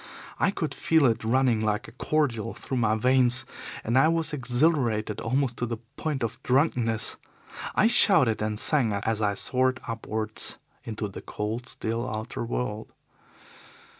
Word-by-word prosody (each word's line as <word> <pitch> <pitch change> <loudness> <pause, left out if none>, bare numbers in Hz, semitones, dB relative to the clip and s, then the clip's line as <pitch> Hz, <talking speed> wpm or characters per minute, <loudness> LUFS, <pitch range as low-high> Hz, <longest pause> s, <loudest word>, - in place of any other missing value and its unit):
I - - +3
could - - -3
feel 160 -3 +3
it 115 -3 +2
running 120 0 +2
like 110 +3 -1
a - - -11
cordial 120 -8 -1
through 130 - -4
my 110 -2 +2
veins, 125 +2 +3 0.4
and 120 +4 +2
I 135 - +5
was 165 -1 0
exhilarated 125 -5 +1
almost 130 +1 0
to 120 - -2
the 115 0 -3 0.2
point 150 -5 -2
of 115 0 -4
drunkenness. 125 -5 +1 0.6
I - - +4
shouted 195 - +5
and 105 0 -1
sang 125 -8 +2
as 110 +2 -1
I 100 -1 +1
soared 130 +4 +1
upwards 110 -1 -3 0.3
into 110 -1 -4
the 100 - -9
cold, 110 +4 -4
still 115 +3 -3
outer 110 +1 -4
world. 115 -2 -4
120 Hz, 150 wpm, -27 LUFS, 110-130 Hz, 0.6 s, I